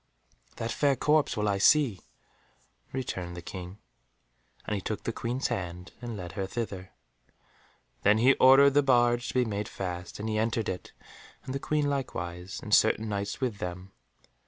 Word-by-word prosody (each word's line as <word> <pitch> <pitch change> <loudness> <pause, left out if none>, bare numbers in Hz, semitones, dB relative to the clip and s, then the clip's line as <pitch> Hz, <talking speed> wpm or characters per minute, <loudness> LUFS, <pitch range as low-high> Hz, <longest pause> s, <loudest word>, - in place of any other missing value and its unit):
"That 115 0 -3
fair 140 -2 +2
corpse 150 +1 +2
will 105 0 0
I 100 -1 +1
see," 130 -3 +4 0.9
returned 90 -9 -4
the - - -6
King, 90 +2 -8 0.9
and - - -2
he 100 - -1
took 105 +2 -4
the 115 - -2
Queen's 125 +4 -2
hand 90 0 -4
and 120 -3 -5
led 90 -3 -6
her 95 +3 -3
thither. 95 -4 -5 1.1
Then 105 +2 +4
he 125 +5 +5
ordered 135 +2 +7
the 145 - +5
barge 120 -3 +3
to - - -4
be 125 -1 +3
made 105 -2 -3
fast, 90 -1 -6
and 105 - -3
he 110 -1 0
entered 115 0 0
it, 90 - -5 0.5
and 130 - -5
the 140 - -2
Queen 150 0 0
likewise, 90 -10 -4
and 105 - -3
certain 110 0 +4
Knights 100 +3 -3
with 120 -6 -1
them. 90 +2 -6
110 Hz, 170 wpm, -29 LUFS, 95-130 Hz, 1.1 s, ordered